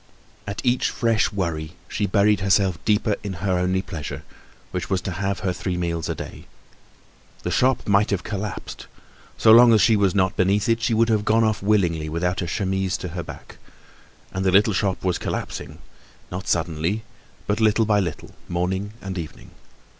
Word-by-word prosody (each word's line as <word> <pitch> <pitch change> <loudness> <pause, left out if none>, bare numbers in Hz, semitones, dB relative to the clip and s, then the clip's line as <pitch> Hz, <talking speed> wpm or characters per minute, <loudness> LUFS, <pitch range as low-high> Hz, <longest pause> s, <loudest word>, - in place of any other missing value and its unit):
At 100 +4 -5
each 125 0 +2
fresh 115 -3 +1
worry 85 -5 -3
she 105 - -1
buried 100 +1 +3
herself 95 -2 +1
deeper 105 -1 +2
in 100 -2 -4
her 90 +1 -1
only 95 +1 0
pleasure, 75 -5 -6 0.5
which 90 -3 -4
was 95 - +1
to 95 - -4
have 95 +1 -2
her 95 -1 0
three 90 0 -3
meals 85 -2 -2
a - - -1
day. - - -9 1.0
The - - -2
shop 130 0 +2
might 100 0 +3
have 100 -2 -1
collapsed. 105 -1 -5 0.5
So 110 - +5
long 120 +1 +9
as 110 - +5
she 115 - +5
was 100 -2 +2
not 95 -1 +2
beneath 100 +2 +2
it, 115 0 +2
she 115 0 +1
would 115 +1 +3
have 110 -2 +2
gone 110 +2 +3
off 110 -1 +1
willingly 90 -7 +1
without 90 +4 -1
a 90 - -2
chemise 95 +1 -1
to 90 - -6
her 85 +1 -4
back. - - -11 0.7
And 95 - -2
the 95 - +3
little 100 +3 +4
shop 95 0 -1
was 90 -2 0
collapsing, - - -5 0.5
not 95 +2 -5
suddenly, 85 +5 -1 0.4
but 105 +1 -1
little 110 0 +3
by 105 -1 +3
little, 85 -5 -4 0.2
morning 95 +4 -2
and 95 -1 -4
evening. 80 -3 -9
95 Hz, 185 wpm, -23 LUFS, 90-105 Hz, 1.0 s, long